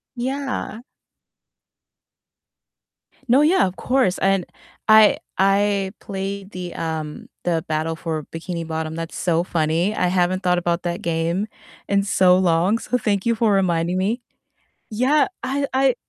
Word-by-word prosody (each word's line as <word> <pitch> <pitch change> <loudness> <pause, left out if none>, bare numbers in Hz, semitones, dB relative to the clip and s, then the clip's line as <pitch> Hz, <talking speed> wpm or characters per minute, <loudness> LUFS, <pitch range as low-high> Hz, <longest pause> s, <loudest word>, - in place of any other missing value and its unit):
Yeah. 260 -2 -3 2.4
No, 255 +4 +5
yeah, 340 +6 +4
of 185 - -6
course 255 -8 +1
and 195 -2 +2 0.4
I 215 -1 +7 0.2
I 195 0 +2
played 195 0 -5
the, 180 -2 -6
um 160 -2 -4 0.2
the 165 -2 0
Battle 155 +1 -1
for 160 -2 -4
Bikini 165 +1 -5
Bottom, 160 0 -3
that's 165 0 -6
so 170 -1 +1
funny, 170 +4 0
I 180 - +1
haven't 185 +1 +1
thought 180 -1 +2
about 175 0 -1
that 175 0 -3
game 170 +4 -1 0.4
in 200 0 +2
so 185 -2 +4
long, 180 +4 +2
so 250 - -1
thank 205 -4 -1
you 230 -1 +2
for 220 -1 +2
reminding 175 -2 +1
me. 210 +6 0 0.7
Yeah, 260 +7 +3 0.2
I 275 +2 -1
I 265 -1 +3
185 Hz, 140 wpm, -22 LUFS, 170-215 Hz, 2.4 s, I